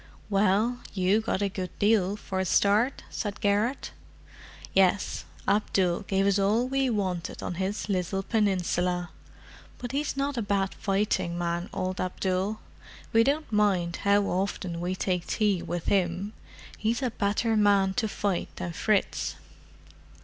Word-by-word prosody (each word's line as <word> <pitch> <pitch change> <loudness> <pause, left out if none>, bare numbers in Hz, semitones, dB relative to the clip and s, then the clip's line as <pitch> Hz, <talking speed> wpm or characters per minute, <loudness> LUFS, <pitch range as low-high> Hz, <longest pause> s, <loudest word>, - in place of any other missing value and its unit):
"Well—you 205 0 +2
got 205 -2 -1
a - - +2
good 185 -2 -6
deal 205 -2 +3
for 190 -2 -4
a - - +2
start," 210 +8 +2
said 205 -2 -4
Garrett. 210 +6 0 0.8
"Yes—Abdul 190 -1 +1
gave 195 0 +2
us 200 0 +3
all 215 +5 +2
we 270 0 +1
wanted 185 -6 -2
on - - -3
his 195 +3 -2
little 195 -1 -1
peninsula. 180 -5 0 0.7
But 245 -1 -6
he's 280 0 -2
not 280 -1 -1
a - - +1
bad 200 -2 0
fighting 195 -4 0
man, 175 0 -2
old 185 0 -2
Abdul; 185 +3 -1 0.5
we 225 0 +6
don't 290 +3 0
mind 190 -5 +2
how 200 0 +3
often 185 -2 -2
we 180 +1 -1
take 180 -2 -1
tea 205 -5 +1
with 175 -1 -4
him. 190 +2 0 0.5
He's 230 +5 0
a 250 - 0
better 220 +1 0
man 200 -2 +4
to 225 -3 +2
fight 200 -3 -1
than 175 -2 -4
Fritz." 210 +3 0
200 Hz, 140 wpm, -27 LUFS, 185-215 Hz, 0.8 s, we